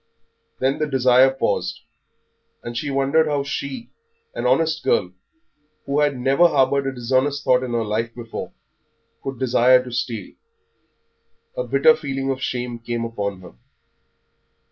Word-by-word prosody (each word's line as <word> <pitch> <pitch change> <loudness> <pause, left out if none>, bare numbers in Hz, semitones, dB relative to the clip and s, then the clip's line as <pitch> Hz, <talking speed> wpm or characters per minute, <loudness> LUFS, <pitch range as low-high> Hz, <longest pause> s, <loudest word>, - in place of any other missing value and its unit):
Then 135 +2 0
the 155 - 0
desire 130 -1 +5
paused, 135 0 -2 0.8
and 120 0 -6
she 145 +5 -3
wondered 140 +4 +2
how 145 -2 0
she, 140 - -5 0.4
an - - -2
honest 160 -2 +1
girl, 90 - +1 0.7
who 140 +1 0
had 145 -2 +2
never 135 +7 +4
harboured 140 -2 +2
a - - 0
dishonest 130 +3 0
thought 125 0 +3
in 125 -2 -4
her 115 -1 0
life 115 +2 -2
before, 115 -2 -7 0.7
could 135 -1 -5
desire 125 0 +4
to 125 - -9
steal; 120 -3 -4 1.2
a - - -2
bitter 475 -1 +5
feeling 135 - -3
of 130 -1 -4
shame 125 -2 -3
came 115 0 -3
upon 100 -4 -4
her. 90 - -13
130 Hz, 145 wpm, -22 LUFS, 120-140 Hz, 1.2 s, desire